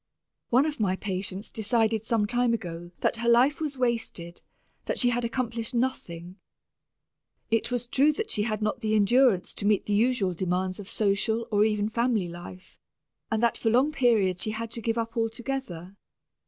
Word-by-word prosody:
One 255 +4 +4
of 305 -4 -3
my 190 -3 +1
patients 190 +1 -4
decided 220 0 +1
some 225 -2 +1
time 240 +1 +1
ago 175 -5 -7
that - - +1
her 235 0 0
life 255 +6 +4
was 295 -3 -3
wasted, 230 -9 -2 0.4
that - - -2
she 245 -1 +3
had 240 0 -1
accomplished 235 -1 -2
nothing. 180 -8 -3 1.1
It 225 - +1
was 245 -1 -1
true 275 +5 +3
that 440 +8 -3
she 210 - +1
had 215 0 -2
not 215 +3 -1
the 215 -1 0
endurance 215 -1 +3
to - - -5
meet 210 -2 +2
the 205 - -1
usual 215 -3 +2
demands 185 +2 -2
of 200 - -8
social 220 +2 0
or 205 0 +4
even 210 -1 0
family 230 -4 0
life, 180 +2 -11 0.5
and 220 +1 -1
that 235 - +2
for 225 - +1
long 255 +6 +3
periods 215 - +2
she 215 - -2
had 225 +1 -4
to 230 - -3
give 225 +1 -1
up 230 0 -3
altogether. 225 -6 -3
225 Hz, 180 wpm, -27 LUFS, 200-240 Hz, 1.1 s, One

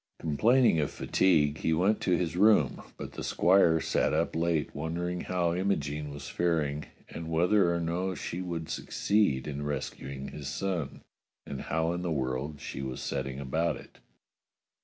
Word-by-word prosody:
Complaining 110 - +3
of 75 - +1
fatigue, 75 -5 +2
he 80 - +1
went 95 +6 +2
to 90 -2 +2
his 85 -2 -2
room, 100 - +4 0.2
but - - -6
the - - -7
squire 85 -3 +4
sat - - +1
up - - 0
late 80 -2 0
wondering 85 +4 -3
how 90 -2 0
Imogene 75 -6 -1
was 70 0 -8
faring, 75 -4 0 0.2
and 80 -1 -6
whether 90 +3 +3
or 85 - 0
no 90 +3 -1
she 85 +1 -4
would 85 -3 -4
succeed 100 -12 +1
in 70 -1 -4
rescuing 70 -2 -4
his 75 -2 -7
son, 90 -5 -3 0.4
and 70 - -5
how 80 +1 0
in 90 - -3
the 90 - -2
world 70 +1 -2
she 70 - -6
was 65 -1 -4
setting 65 0 -3
about 80 +4 0
it. - - -14
80 Hz, 160 wpm, -29 LUFS, 75-90 Hz, 0.4 s, room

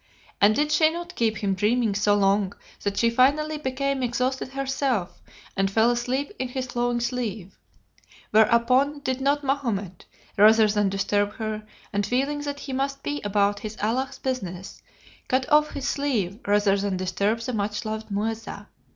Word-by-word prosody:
And 210 +2 +6
did 300 +1 +1
she 310 +1 +5
not 345 +2 -6
keep 220 -2 0
him 200 -3 0
dreaming 215 +3 +1
so 205 +1 +2
long 200 -1 +2 0.3
that 200 -1 -2
she 230 0 +3
finally 300 +5 +2
became 275 0 -1
exhausted 255 +2 -1
herself, 270 -7 -2 0.3
and 195 0 +1
fell 225 +4 +3
asleep 250 +6 -1
in 255 - -1
his 255 0 -3
flowing 240 -1 -1
sleeve; 235 -6 -3 0.8
whereupon 250 +6 +3
did 260 -2 -2
not 285 +2 +1
Mahomet, 230 -10 -2 0.3
rather 220 +2 +7
than 205 -1 +1
disturb 205 +1 0
her, 215 -1 -4 0.3
and 205 0 +1
feeling 275 +6 0
that 285 0 -5
he 275 - -6
must 275 +1 -2
be 290 0 -3
about 205 0 +1
his 215 0 -7
Allah's 250 +6 -1
business, 190 -9 -5 0.5
cut 255 0 +1
off 300 0 +5
his 275 - -3
sleeve 225 -9 -1
rather 205 -1 +3
than 200 -1 -1
disturb 200 +5 0
the 250 +2 -4
much 210 +1 -2
loved 220 0 -4
Muezza? 220 +2 -4
235 Hz, 160 wpm, -25 LUFS, 205-270 Hz, 0.8 s, rather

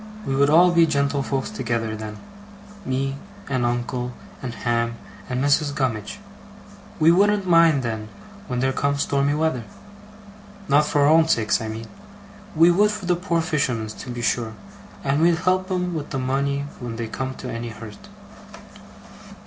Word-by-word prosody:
We 135 - -1
would 140 +1 +4
all 175 +4 +6
be 170 -1 +5
gentlefolks 140 -2 -1
together, 115 -3 -2
then. 110 -1 -7 0.7
Me, 135 +1 -1 0.3
and 130 -3 -1
uncle, 120 +1 -2 0.3
and 130 - -4
Ham, 115 -1 -1 0.3
and 125 +1 -1
Mrs. 145 0 +2
Gummidge. 125 - -2 0.8
We 160 +1 +6
wouldn't 200 +2 +3
mind 165 -5 +5
then, 110 -2 -4 0.4
when 125 -1 -2
there 130 0 +1
comes 140 +1 0
stormy 140 +1 +1
weather. 155 -6 0 1.0
Not 145 +2 +4
for 145 - +1
our 140 - +5
own 160 +1 +5
sakes, 115 -8 +2
I 110 - -4
mean. 110 +1 -6 0.7
We 165 +2 +6
would 205 +4 +4
for 210 -2 -5
the 175 0 +2
poor 170 -2 0
fishermen's, 125 -10 -1
to - - -9
be 120 -1 -5
sure, 110 +1 -1 0.5
and 140 +2 +1
we'd 170 0 +5
help 185 +2 0
'em 180 -1 -1
with 155 -3 -5
money 140 +2 -1
when 120 -2 -5
they 115 0 -3
come 130 +3 -4
to - - -7
any 115 +1 -4
hurt. 110 -2 -11
140 Hz, 160 wpm, -23 LUFS, 120-160 Hz, 1.0 s, all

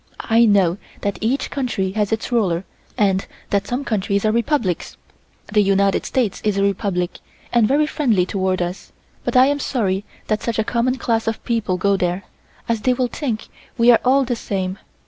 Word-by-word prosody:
I 230 +1 +6
know 195 -4 +3 0.2
that 200 -1 -2
each 260 +5 0
country 240 -9 -1
has 210 0 -1
its 225 +2 -2
ruler 190 -7 +1 0.3
and 195 -3 +2 0.2
that 200 0 +1
some 255 +3 -2
countries 200 -1 0
are 215 - +3
republics. 235 - -1 0.6
The 210 - +5
United 195 0 +2
States 240 -7 -1
is 210 -2 +1
a 195 - +2
republic 195 -3 -1 0.3
and 235 -3 +4
very 290 +4 +3
friendly 235 -12 +1
toward 185 -1 0
us, 175 +2 -6 0.3
but - - +1
I 255 - +8
am 285 +1 +1
sorry 200 -9 -1 0.2
that 215 -1 -1
such 230 -2 -2
a 220 - +2
common 245 +3 0
class 225 -3 0
of 225 -1 -2
people 220 -6 0
go 200 +2 +2
there, 180 +1 -1 0.4
as 230 -2 0
they 255 +2 +2
will 250 -1 0
think 235 -7 -3 0.3
we 235 0 +6
are 235 - +6
all 270 +2 +4
the 245 0 -1
same. 190 -3 -3
215 Hz, 185 wpm, -20 LUFS, 195-240 Hz, 0.6 s, I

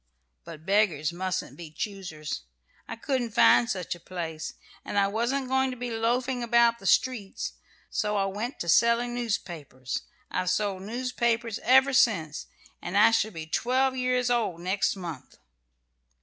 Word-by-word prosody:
But 155 +1 -10
beggars 180 -7 +2
mustn't 185 +1 -3
be 170 -2 -9
choosers. 155 - -5 0.5
I 230 - -5
couldn't 240 -2 -2
find 235 - +6
such 185 -5 -2
a 175 - -11
place; 165 -3 -6 0.3
and - - -4
I 200 - +5
wasn't 240 +6 -1
going 265 +1 +2
to 255 - -6
be 245 0 -4
loafing 245 +3 0
about 235 0 +3
the 195 - -6
streets, 230 -6 +1 0.4
so 210 0 0
I 195 - +2
went 210 +7 -4
to 170 - -4
selling 235 +6 +3
newspapers. 170 - -4 0.3
I've 185 -1 -1
sold 195 0 0
newspapers 235 0 -1
ever 265 +2 +5
since, 200 - +2 0.3
and - - -2
I - - +7
shall 220 -1 +2
be 160 -6 -7
twelve 255 +10 +1
years 250 -1 +1
old 220 -8 0
next 190 +4 0
month." 170 -8 -8
215 Hz, 150 wpm, -27 LUFS, 180-245 Hz, 0.5 s, I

